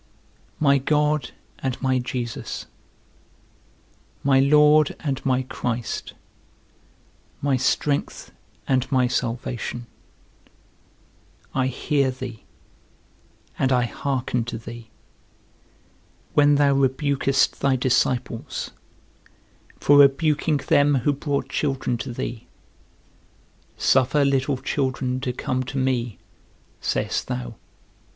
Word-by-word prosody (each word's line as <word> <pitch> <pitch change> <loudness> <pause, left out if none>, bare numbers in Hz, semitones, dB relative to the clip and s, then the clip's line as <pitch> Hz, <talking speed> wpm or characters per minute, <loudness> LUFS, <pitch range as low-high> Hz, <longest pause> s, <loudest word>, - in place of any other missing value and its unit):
My 140 -2 +4
God 150 0 +1 0.3
and 130 -2 -3
my 130 -1 +1
Jesus, 125 -2 -4 1.6
my 135 -1 +4
Lord 150 +2 +5
and 135 -4 -2
my 130 -1 +1
Christ, 120 -2 -4 1.3
my 140 -1 +1
strength 140 +3 -1 0.4
and 130 0 +1
my 130 -2 +3
salvation, 120 -1 -3 1.7
I 130 -1 +1
hear 135 +1 0
thee, 130 -3 -7 1.1
and 135 - +2
I 125 -1 +3
hearken 125 -1 -2
to 120 - -5
thee, 115 0 -10 1.4
when 145 0 +5
thou 140 -1 +4
rebukest 135 0 +1
thy 140 -1 +2
disciples, 125 -2 -1 1.1
for 145 0 +5
rebuking 150 +2 +4
them 145 +1 +3
who 145 - +3
brought 145 0 -2
children 135 -4 -1
to 110 - -5
thee; 120 -1 -5 1.3
Suffer 135 +2 +3
little 135 0 +1
children 130 -1 -1
to 130 -1 -2
come 130 +1 -2
to 135 +2 -5
me, 125 -4 -1 0.6
sayest - - -1
thou. 60 -1 -4
130 Hz, 95 wpm, -23 LUFS, 125-140 Hz, 1.7 s, Lord